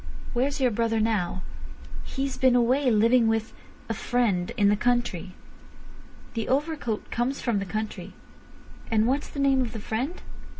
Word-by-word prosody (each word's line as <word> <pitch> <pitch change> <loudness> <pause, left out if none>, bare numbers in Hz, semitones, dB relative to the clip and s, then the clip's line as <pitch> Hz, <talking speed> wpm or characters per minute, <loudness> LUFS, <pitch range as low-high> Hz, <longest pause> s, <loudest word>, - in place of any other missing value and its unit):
"Where's 275 +4 0
your 255 -2 +3
brother 225 0 +1
now?" 205 -5 0 0.6
"He's 270 -1 -3
been 255 -1 +4
away 255 +3 +3
living 230 +2 +4
with—a 225 +1 -4
friend—in 205 -3 +1
the 205 - +4
country." 215 -6 -1 1.0
"The 225 -2 -3
overcoat 280 -5 -1
comes 250 +4 -1
from 230 -5 0
the 195 - -3
country. 215 +3 -4 0.8
And 220 -1 +3
what's 270 +4 0
the 280 - -7
name 275 -1 +3
of 240 -2 -3
the 225 - -5
friend?" 250 - -3
235 Hz, 140 wpm, -26 LUFS, 215-260 Hz, 1.0 s, been